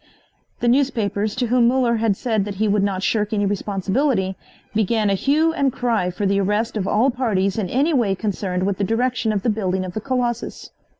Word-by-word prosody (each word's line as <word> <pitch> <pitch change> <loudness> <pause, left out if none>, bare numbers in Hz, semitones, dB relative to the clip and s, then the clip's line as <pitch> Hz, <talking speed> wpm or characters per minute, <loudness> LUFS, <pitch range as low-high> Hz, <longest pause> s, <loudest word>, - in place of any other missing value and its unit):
The 240 - +1
newspapers, 225 -5 +1
to 250 0 0
whom 240 0 +3
Muller 245 -2 +2
had 220 -3 +1
said 220 -5 0
that 205 -1 -5
he 215 +3 0
would 205 0 +2
not 195 -1 -1
shirk 210 0 0
any 205 -1 +1
responsibility, 195 +1 0 0.4
began 215 -1 +1
a - - +3
hue 305 +10 +2
and 280 -4 +1
cry 230 -7 0
for 180 +3 -3
the 200 0 +2
arrest 210 +4 0
of 195 -3 -2
all 245 +6 +3
parties 215 -6 0
in 190 -4 -2
any 285 - +1
way 225 -8 +2
concerned 185 -3 -2
with 195 0 -1
the - - +1
direction 230 +2 0
of 200 -2 -2
the - - +1
building 190 -3 -1
of 180 - -7
the 215 - -4
Colossus. 240 -2 -3
215 Hz, 205 wpm, -21 LUFS, 195-245 Hz, 0.4 s, whom